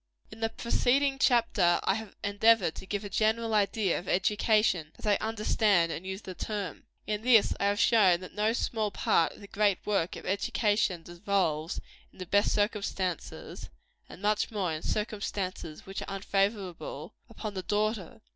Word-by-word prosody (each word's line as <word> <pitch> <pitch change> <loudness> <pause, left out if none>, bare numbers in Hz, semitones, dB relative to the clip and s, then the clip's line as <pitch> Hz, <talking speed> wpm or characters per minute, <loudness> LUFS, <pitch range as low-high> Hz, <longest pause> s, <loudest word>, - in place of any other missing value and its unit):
In - - -11
the 225 0 0
preceding 270 +4 +1
chapter 230 -9 +3
I - - +2
have 220 -1 -6
endeavored 205 -3 +3
to 190 - -10
give 205 +1 -3
a - - -3
general 220 +3 +1
idea 205 -2 +1
of 180 - -12
education, 195 -4 +2
as - - -11
I 205 -1 +4
understand 210 -5 +1
and 165 +4 -6
use 190 +2 -5
the 185 - -7
term. 200 -3 -5 0.2
In 210 -1 -2
this 230 -2 +5
I - - +1
have 205 0 +1
shown 195 -7 +5
that 185 - -10
no 215 +1 +1
small 220 -3 -1
part 170 -3 +1
of - - -16
the 200 - -10
great 200 -2 +2
work 195 -5 0
of - - -9
education 200 -2 0
devolves, 175 -3 -1 0.3
in - - -23
the 185 - -6
best 205 +4 +2
circumstances 200 -4 -2 0.4
and 190 - -12
much 210 0 +1
more 195 -7 -2
in 155 - -4
circumstances 200 -6 -3
which 195 0 -6
are - - -6
unfavorable 195 -2 -2 0.2
upon 215 -2 -6
the 190 - -3
daughter. 215 +4 -2
205 Hz, 170 wpm, -29 LUFS, 185-215 Hz, 0.4 s, this